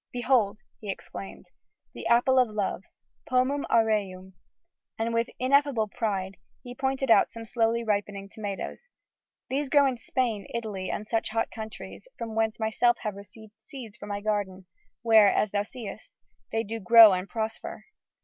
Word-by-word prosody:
"Behold!" 240 -5 +1 0.2
he 210 - -8
exclaimed, 195 0 -8 0.4
"the - - -6
Apple 245 +2 +4
of 250 - +4
Love, 205 -4 -2 0.5
Pomum 255 +3 +1
Aureum!" 200 -4 +1 0.6
and, 230 +1 -1
with 230 0 0
ineffable 260 -3 +2
pride, 195 -3 -3 0.3
he 245 - -8
pointed 265 0 -1
out 205 -3 +6
some 230 0 -9
slowly 230 +1 0
ripening 205 -2 -2
tomatoes. 205 - -6 0.6
"These 275 +1 -1
grow 285 -1 +5
in 260 -2 0
Spain, 230 -6 -2
Italy 210 -5 -4
and 210 - -3
such 225 +1 -1
hot 225 +1 -1
countries, 220 - -9
from 230 -1 -5
whence 220 0 0
myself 225 +2 +2
have 210 -2 -3
received 210 +2 -13
seeds 225 -2 -10
for 205 - -10
my 205 0 -4
garden, 200 -3 -2 0.4
where, 220 -3 +6
as 210 - +1
thou 205 - +1
seest, 215 -1 -9 0.4
they 225 0 0
do 225 +2 -5
grow 225 +1 +9
and 185 +1 -3
prosper.... 220 -1 -5
220 Hz, 155 wpm, -27 LUFS, 205-240 Hz, 0.6 s, grow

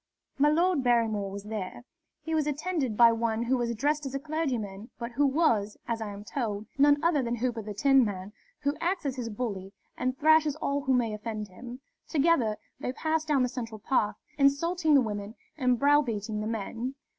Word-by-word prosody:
"My 295 +2 +5
Lord 335 -1 +2
Barrymore 225 -5 +2
was 200 +1 -7
there. 210 +1 -5 0.4
He 320 - -3
was 310 -2 +1
attended 295 -6 -1
by 235 -1 +8
one 230 0 0
who 250 +2 +1
was 235 -2 -1
dressed 295 +6 0
as 270 - -6
a - - -1
clergyman, 250 -9 -3
but 235 0 -5
who 280 +4 +2
was, 250 -9 +1
as 230 -1 -2
I 210 -2 -4
am 200 0 -8
told, 215 -3 -3
none 290 +1 +6
other 330 -4 +3
than 240 -1 -1
Hooper 240 -1 -2
the 210 -1 -7
Tinman, 210 -6 +2 0.3
who 285 0 0
acts 355 -1 -1
as 270 -2 -1
his 245 -3 -4
bully 205 -4 -4 0.2
and 255 +1 -2
thrashes 310 0 +4
all 285 -2 -1
who 265 -1 +1
may 230 -3 +1
offend 215 -1 -5
him. 245 +7 -10 0.3
Together 280 -9 +2 0.2
they 250 - -3
passed 315 +2 -1
down 285 -4 +3
the - - +2
central 230 -3 -6
path, 210 -2 0 0.2
insulting 310 +3 +3
the 275 - +6
women 210 -1 -4 0.2
and 255 -4 +2
browbeating 230 -7 +2
the 215 - -3
men. 230 +4 -4
250 Hz, 190 wpm, -28 LUFS, 215-290 Hz, 0.4 s, by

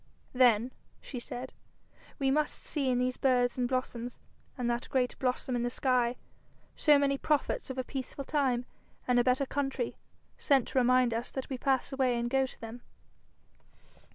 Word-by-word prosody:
'Then,' 245 -1 +4 0.3
she 255 - -7
said, 245 +2 -7 0.6
'we 270 -2 +1
must 300 +2 -1
see 280 -4 0
in 250 - +2
these 250 0 0
birds 245 -2 +2
and 245 -1 -1
blossoms, 250 -2 -3 0.4
and 250 -2 -1
that 240 0 -2
great 255 -2 +1
blossom 255 0 -1
in 240 - 0
the 240 - 0
sky, 250 -1 +1 0.6
so 300 -2 +5
many 275 -1 +1
prophets 305 - 0
of 260 - -5
a 260 - 0
peaceful 270 +2 -5
time 260 -5 +1 0.4
and 250 -1 +4
a - - +4
better 255 +2 +2
country, 270 -3 -2 0.4
sent 275 -5 +3
to 265 - +1
remind 250 -1 +4
us 230 +2 -2
that 265 - -5
we - - 0
pass 270 0 +1
away 260 -3 +2
and 240 0 -2
go 265 0 +3
to - - -14
them.' 230 +2 -8
255 Hz, 175 wpm, -30 LUFS, 245-270 Hz, 0.6 s, so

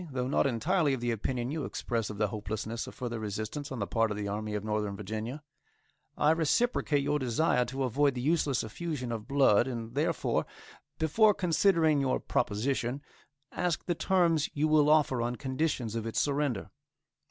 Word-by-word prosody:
Though 130 -2 -2
not 140 - +2
entirely 145 - +1
of - - -7
the 120 0 -1
opinion 120 +3 -2
you 155 -1 -3
express 115 -4 -2
of 105 - -6
the 105 -1 +1
hopelessness 110 +2 -4
of - - -10
further 120 -2 -4
resistance 110 +7 -4
on 130 - -4
the 100 - -1
part 115 +2 +1
of 105 - -3
the 105 -1 -3
Army 105 +1 -3
of 105 - -3
Northern 105 -2 -2
Virginia; 110 +8 -5 0.7
I 150 - +4
reciprocate 160 - +1
your 145 +1 +1
desire 125 0 +1
to 135 +2 -3
avoid 135 +2 +2
the 125 - -3
useless 150 -2 +1
effusion 130 +1 -4
of 110 -2 -5
blood, 135 -5 +4
and 115 -2 -5
therefore, 145 +4 0 0.5
before 205 +7 +4
considering 165 -4 +3
your 130 -1 +1
proposition, 120 +4 -1 0.5
ask 175 -2 -1
the 175 - +1
terms 170 -3 +2
you 150 +2 +2
will 155 -1 +4
offer 150 -5 +3
on 120 +1 -1
conditions 130 -3 -2
of 115 -1 -3
its 115 - -1
surrender. 140 -7 -1
130 Hz, 175 wpm, -30 LUFS, 115-150 Hz, 0.7 s, I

